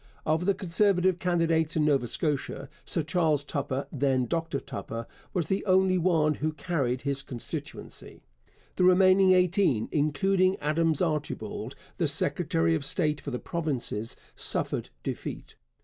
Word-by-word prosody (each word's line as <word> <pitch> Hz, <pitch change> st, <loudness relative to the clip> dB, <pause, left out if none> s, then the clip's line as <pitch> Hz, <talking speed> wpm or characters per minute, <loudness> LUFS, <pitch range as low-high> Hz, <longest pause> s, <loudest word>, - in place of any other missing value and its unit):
Of 160 Hz, +4 st, +1 dB
the 200 Hz, -, +3 dB
Conservative 185 Hz, 0 st, +2 dB
candidates 165 Hz, -3 st, +1 dB
in 155 Hz, -2 st, +2 dB
Nova 140 Hz, -5 st, +2 dB
Scotia, 140 Hz, 0 st, -2 dB, 0.2 s
Sir 165 Hz, -, -1 dB
Charles 155 Hz, -3 st, +1 dB
Tupper, 140 Hz, -1 st, -3 dB
then 135 Hz, -2 st, +1 dB
Dr 165 Hz, -1 st, -2 dB
Tupper, 115 Hz, 0 st, -6 dB, 0.3 s
was 175 Hz, -5 st, -1 dB
the 190 Hz, +3 st, -1 dB
only 185 Hz, 0 st, +4 dB
one 160 Hz, -3 st, +2 dB
who 155 Hz, +2 st, -2 dB
carried 140 Hz, -7 st, -2 dB
his 140 Hz, -1 st, -1 dB
constituency. 125 Hz, -4 st, -8 dB, 0.5 s
The -, -, +2 dB
remaining 185 Hz, +1 st, +6 dB
eighteen, 180 Hz, -, +2 dB
including 185 Hz, +6 st, +2 dB
Adams 160 Hz, +2 st, +1 dB
Archibald, 155 Hz, -3 st, -3 dB, 0.2 s
the -, -, +1 dB
secretary 80 Hz, 0 st, +1 dB
of 80 Hz, -, -1 dB
state 150 Hz, 0 st, 0 dB
for -, -, -6 dB
the 125 Hz, -, -3 dB
provinces, 135 Hz, -, -2 dB, 0.2 s
suffered -, -, 0 dB
defeat. -, -, -6 dB
160 Hz, 135 wpm, -28 LUFS, 140-180 Hz, 0.5 s, remaining